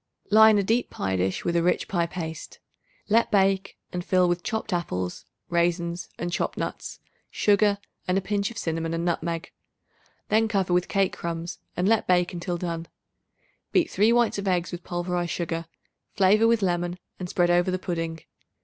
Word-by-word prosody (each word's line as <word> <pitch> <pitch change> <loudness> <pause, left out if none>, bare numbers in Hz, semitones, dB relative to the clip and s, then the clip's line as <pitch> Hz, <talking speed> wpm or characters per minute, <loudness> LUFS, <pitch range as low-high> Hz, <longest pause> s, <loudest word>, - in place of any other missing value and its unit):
Line 220 0 +7
a 200 - +2
deep 230 +5 +1
pie 95 0 -2
dish 95 +1 -1
with 170 - 0
rich 170 +1 +1
pie 170 -3 0
paste. 160 -3 -6 0.5
Let 230 +2 +3
bake 195 -1 +2 0.2
and 180 0 -3
fill 180 0 +3
with 175 0 0
chopped 220 0 -3
apples, 90 - -3 0.2
raisins 170 0 0
and 175 +1 -3
chopped - - -2
nuts, - - -5 0.3
sugar 205 0 +3 0.3
and 180 +1 +2
a - - +4
pinch 200 0 -1
of 235 - -10
cinnamon 165 -2 -2
and 170 +1 -2
nutmeg. 170 -1 -2 0.8
Then 220 +1 +3
cover 195 -4 0
with 180 0 +2
cake 195 -2 +1
crumbs 170 0 -5 0.2
and 180 - +1
let 225 0 +2
bake 180 -1 +2
until 175 0 -3
done. 170 -1 -4 0.9
Beat 345 -2 +3
3 210 +4 +4
whites 235 -3 +2
of 200 - -4
eggs 180 -2 +1
with 175 -1 -6
pulverized 175 0 -2
sugar; 165 -1 -3 0.5
flavor 210 +3 +5
with 230 -2 +3
lemon 175 -1 0 0.2
and 180 -1 -5
spread 175 -1 +2
over 175 +1 +3
the 185 - 0
pudding. 165 -3 -3
180 Hz, 175 wpm, -26 LUFS, 170-200 Hz, 0.9 s, Line